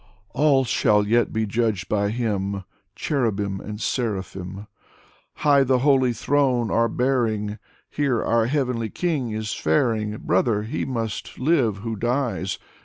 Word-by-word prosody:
All 145 -1 +3
shall 105 -3 +3
yet 120 +2 +2
be 110 0 0
judged 110 -3 -1
by 100 -1 +1
Him. 100 -4 -2 0.3
Cherubim 105 -8 -1
and 105 0 -7
seraphim 105 -6 -2
Dmitry 95 +3 -8
Merezhkovsky 100 -1 -33
59 - - -11
High 140 -1 +6
the 130 0 +2
holy 130 -4 +4
Throne 125 -1 +1
are 115 0 +2
bearing 115 -5 0
I 105 - -9 0.3
Here 140 -6 0
our 115 0 +2
heavenly 125 -5 -1
King 155 - -1
is 110 0 -3
faring. 105 +5 0
Brother, 105 +3 +1
he 110 - -3
must 115 -5 -4
live 130 -7 +2
who 115 -1 -2
dies. 120 -4 -1
115 Hz, 150 wpm, -23 LUFS, 105-130 Hz, 0.3 s, High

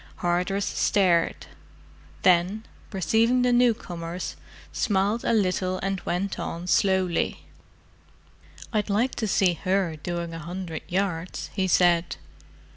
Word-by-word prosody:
Hardress 180 +3 0
stared: 180 -4 +1 0.8
then, 185 +5 +3 0.2
perceiving 225 +6 +2
the 250 0 +3
newcomers, 180 -8 0 0.4
smiled 205 +3 +1
a - - +1
little 185 -3 +1
and 195 -1 -1
went 185 +3 -2
on 170 +1 -4
slowly. 190 -1 +1 1.3
"I'd 215 0 0
like 225 +6 +1
to 220 - -1
see 190 -2 +3
her 185 -1 0
doing 170 +1 -4
a 165 - -6
hundred 170 0 -6
yards!" 180 -2 -2
he 190 -2 0
said. 175 -1 +3
185 Hz, 115 wpm, -25 LUFS, 175-200 Hz, 1.3 s, then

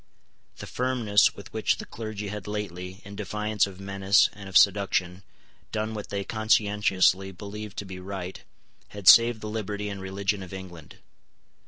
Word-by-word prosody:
The - - -7
firmness 120 -5 +2
with - - -12
which - - +1
the - - -7
clergy 110 -2 -6
had 105 -1 -6
lately, 95 -2 -5
in 100 0 -9
defiance 105 +1 -1
of 95 -1 -11
menace 100 0 +3
and 100 0 -10
of 95 - +4
seduction, 95 -2 +3 0.5
done 110 0 -2
what 105 -2 -6
they 100 -1 -2
conscientiously 105 -3 +2
believed 105 +2 -8
to 100 - -4
be 95 -1 -8
right, 95 -1 -6 0.5
had 100 -3 -9
saved 115 -1 +8
the 110 - -5
liberty 105 -1 -4
and 100 -1 -6
religion 95 +1 -2
of 95 0 -9
England. 90 -5 -10
100 Hz, 160 wpm, -26 LUFS, 95-105 Hz, 0.5 s, saved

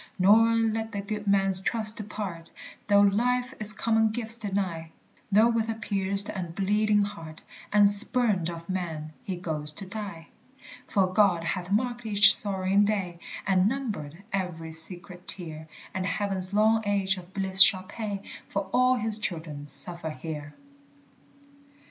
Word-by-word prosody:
Nor 225 +5 +4
let 225 0 -2
the 200 - -4
good 210 0 -6
man's 195 -1 +5
trust 220 +1 +2
depart, 200 -6 -7 0.4
Though 200 -1 +4
life 245 +5 0
its 215 0 +7
common 220 +1 0
gifts 225 +1 +2
deny, 190 -6 -4 0.4
Though 215 +4 +4
with 230 -1 -1
a 225 - -3
pierced 200 -2 0
and 175 -4 -6
bleeding 210 +2 +1
heart, 165 -6 -9 0.3
And 205 0 +5
spurned 205 -3 +3
of 170 -1 -9
men, 160 -5 -5
he 195 -6 -5
goes 155 -4 -6
to 195 - -10
die. 190 -4 -9 0.6
For 195 -3 +1
God 190 -5 +2
hath 175 +1 -4
marked 240 +3 -2
each 200 -1 +6
sorrowing 195 0 +4
day 195 -5 -3 0.3
And 190 0 +2
numbered 200 - -6
every 175 -4 -4
secret 175 +2 -2
tear, 160 -4 -8 0.3
And 185 -2 -3
heaven's 195 -3 +2
long 220 +2 +2
age 195 -1 0
of 180 0 -12
bliss 190 0 0
shall 190 -3 +7
pay 200 0 -7 0.2
For 195 -1 -5
all 255 0 +3
his 220 -2 -4
children 160 -7 -6
suffer 165 +3 -1
here. 150 -2 -8
200 Hz, 150 wpm, -26 LUFS, 175-215 Hz, 0.6 s, its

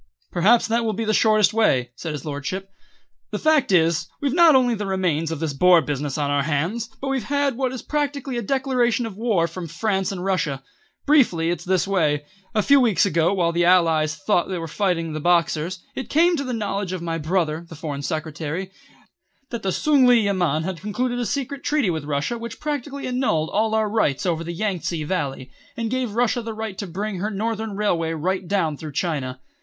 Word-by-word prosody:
"Perhaps 210 +7 +4
that 230 +1 +1
will 220 -1 0
be 225 +3 -3
the 215 - +1
shortest 215 -1 +4
way," 130 - +2
said 160 +2 -5
his 145 -1 -6
lordship. 170 +7 -4 0.6
"The - - -3
fact 310 -7 +2
is, 165 -3 +3
we've 280 -2 -1
not 335 -3 +6
only 250 -2 +4
the 205 -2 -3
remains 175 -5 0
of 160 - -3
this 160 -2 -2
Boer 180 +4 +6
business 145 -2 -3
on 145 -1 0
our 145 0 +2
hands, 165 +11 -1
but 275 - -3
we've 265 -5 -1
had 285 +1 0
what 260 0 -1
is 260 - -6
practically 285 -3 -2
a 240 - -1
declaration 250 -1 +1
of 220 -4 -6
war 210 -6 +1
from 170 +1 -7
France 190 +3 -1
and 185 -1 -5
Russia. 150 -8 -1 0.4
Briefly 205 - +3
it's 175 - -3
this 185 0 +1
way. 150 -7 +1 0.3
A 215 - +3
few 280 +4 +6
weeks 230 -8 +3
ago, 170 -3 +2
while 170 -3 +2
the 170 +1 +1
Allies 165 -4 +3
thought 160 +5 0
they 185 - -2
were 165 -1 -4
fighting 165 -2 -1
the 155 - -3
Boxers, 170 +1 +1 0.2
it 265 - -6
came 340 +3 +4
to 280 - -2
the 255 - -4
knowledge 205 -4 -2
of 180 -2 -4
my 165 -1 -2
brother, 165 0 -1
the 160 - -9
Foreign 145 -2 -5
Secretary, 160 +4 -4 0.8
that 235 - -4
the 190 - -1
Tsung 280 +3 +3
li 245 -2 +6
Yamen 175 -6 +1
had 175 -1 -4
concluded 245 +4 -2
a 240 - -1
secret 280 0 -3
treaty 290 -10 +1
with 160 -3 -4
Russia 150 +11 -2
which 235 0 -7
practically 285 -2 -4
annulled 250 -12 0
all 220 +1 +1
our 220 -1 +2
rights 205 -11 0
over 165 -2 0
the 170 - -5
Yang 190 +1 -2
tse 165 -1 -3
Valley, 140 -6 -3 0.3
and 230 -1 -2
gave 255 -4 -2
Russia 240 +1 +1
the 225 -1 -6
right 220 -3 -5
to 200 - -4
bring 195 +2 -4
her 205 +4 -1
Northern 220 0 -3
Railway 170 -6 0
right 185 +3 -2
down 165 -7 0
through 155 -1 -8
China. 130 -6 -2
190 Hz, 210 wpm, -23 LUFS, 165-235 Hz, 0.8 s, not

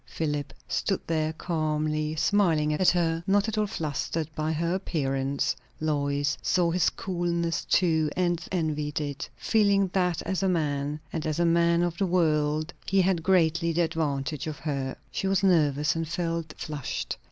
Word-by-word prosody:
Philip 150 -3 -2 0.2
stood 195 - -1
there, 155 -1 0
calmly 155 -2 -1
smiling 160 -4 +2
at 180 +4 +4
her, 165 -2 +1
not 200 +2 +3
at 220 - -2
all 215 -1 +1
flustered 155 -2 -2
by 155 +1 -1
her 170 +2 0
appearance. 140 -7 -1 0.2
Lois 145 -2 0
saw 175 -2 +2
his 180 0 +3
coolness 170 -2 -2
too, 160 -4 +2
and 175 -2 +1
envied 155 -4 -1
it; 145 0 -4
feeling 200 -3 +2
that 180 -3 +1
as 190 -3 -2
a 190 - +2
man, 150 -3 -1
and 160 -2 -2
as 155 +1 -1
a 170 - +3
man 170 0 +3
of 175 -1 -2
the 195 - +2
world, 155 -2 +1
he 195 0 +3
had 180 -2 +1
greatly 170 -1 +2
the 175 - +2
advantage 150 -3 -1
of 155 -1 -4
her. 140 -4 -3 0.2
She 195 - -2
was 195 0 +1
nervous, 150 -5 +3
and 165 0 -2
felt 165 -1 -3
flushed. 150 -4 -4
165 Hz, 165 wpm, -27 LUFS, 150-175 Hz, 0.2 s, at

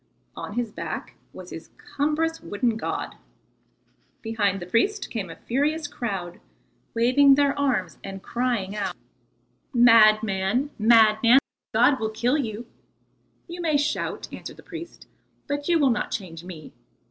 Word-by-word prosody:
On - - -7
his 235 -1 -2
back - - -6 0.2
was - - -11
his - - -9
cumbrous 320 +3 -1
wooden 230 +2 -1
god. 225 - -4 1.1
Behind 205 -4 0
the 175 - -7
priest 385 - 0
came 200 -6 -4
a 165 - -8
furious 295 +5 -1
crowd, 195 -10 -5 0.6
waving 265 +4 +5
their 280 0 +3
arms 215 -11 0
and 195 -1 -8
crying 235 -5 -2
out: 195 -4 -3 0.8
"Madman, 220 +1 +4
madman, 225 +2 +6 0.3
the - - -1
god 255 +4 +4
will 220 - -1
kill 240 +7 0
you." 225 -2 -4 0.8
"You 350 0 -7
may 315 -3 +2
shout," 290 +2 -2
answered - - -8
the - - -14
priest, 340 -3 -10 0.4
"but 285 0 -3
you 345 -1 +4
will 280 -5 +3
not 215 - -1
change 170 -4 -6
me. 175 -4 -10
235 Hz, 140 wpm, -25 LUFS, 205-285 Hz, 1.1 s, madman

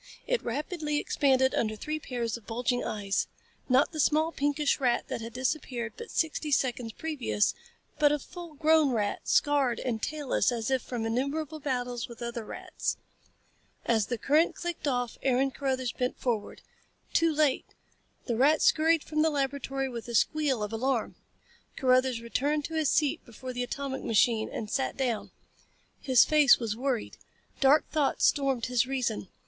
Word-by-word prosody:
It - - 0
rapidly 300 +4 -2
expanded 265 -3 +2
under 215 -1 0
three 305 +8 -4
pairs 240 -5 -3
of 235 -3 -11
bulging 245 +2 -1
eyes 200 -2 -1 0.4
not 260 +2 +4
the 310 - -6
small, 310 +3 +3
pinkish 290 -1 0
rat 245 -3 +1
that - - -3
had 230 0 -7
disappeared 255 -3 -2
but 465 - -9
sixty 315 -1 -1
seconds 250 -4 0
previous, 295 -9 0 0.5
but 295 -1 +5
a 295 - +2
full 340 +2 -10
grown 310 0 +4
rat, 210 -5 -1
scarred 280 -5 +2
and 230 -4 -2
tailless 295 -3 0
as 235 +1 -2
if 260 -1 +2
from 235 -3 -4
innumerable 280 +7 -2
battles 250 -3 -2
with 235 -1 -9
other 235 -1 -4
rats. - - -4 0.9
As 220 -3 +2
the 240 - -2
current 300 +9 +2
clicked 345 -3 -4
off 245 -3 -1
Aaron 270 +1 +2
Carruthers 260 -3 -2
bent 250 0 -2
forward. 230 -5 -3 0.5
Too 330 -1 +3
late. 300 -3 +1 0.6
The 235 - -1
rat 285 +6 +4
scurried 320 0 +4
from 305 0 -1
the 320 - +4
laboratory 275 -1 -2
with 240 -3 -7
a 235 - -4
squeal 280 -2 +2
of 210 +1 -4
alarm. 240 0 -1 0.6
Carruthers 255 -2 +2
returned 290 +6 -1
to 325 - -6
his 315 -3 +1
seat 295 -3 +1
before 255 +2 -8
the 245 - -3
atomic 265 +2 -4
machine 225 0 +2
and 215 - -5
sat 265 +5 -2
down. 245 -5 -1 0.7
His 260 -4 +5
face 300 -4 +6
was 225 -3 -3
worried. 250 -1 -2 0.4
Dark 280 +3 +4
thoughts 295 -3 +1
stormed 270 -4 +2
his 250 0 +1
reason. 245 -7 -2
265 Hz, 165 wpm, -29 LUFS, 235-295 Hz, 0.9 s, face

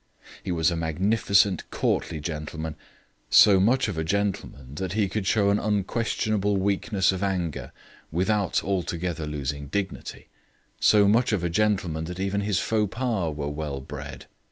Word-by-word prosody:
He - - -3
was 80 -1 +2
a - - -1
magnificent 95 +4 +1
courtly 80 - -1
gentleman; 80 0 -5 0.5
so 100 -2 +7
much 120 +7 +3
of 95 -6 -3
a - - 0
gentleman 90 -8 -2
that 95 +4 -4
he 105 -2 +1
could 95 0 -3
show 100 -1 +3
an 100 - +2
unquestionable 105 0 0
weakness 100 0 +1
of 95 -1 -4
anger 90 -5 -2 0.4
without 95 +4 +1
altogether 85 -4 -2
losing 70 -1 -4
dignity; 95 +6 -4 0.5
so 105 -1 +5
much 115 +4 +3
of 100 -5 0
a 85 - -1
gentleman 95 -5 0
that 90 +2 -7
even 100 +1 -1
his 100 -1 0
faux 105 -3 0
pas 110 - -1
were 75 -1 -3
well 75 -2 -4
bred. 65 - -8
95 Hz, 155 wpm, -25 LUFS, 80-105 Hz, 0.5 s, so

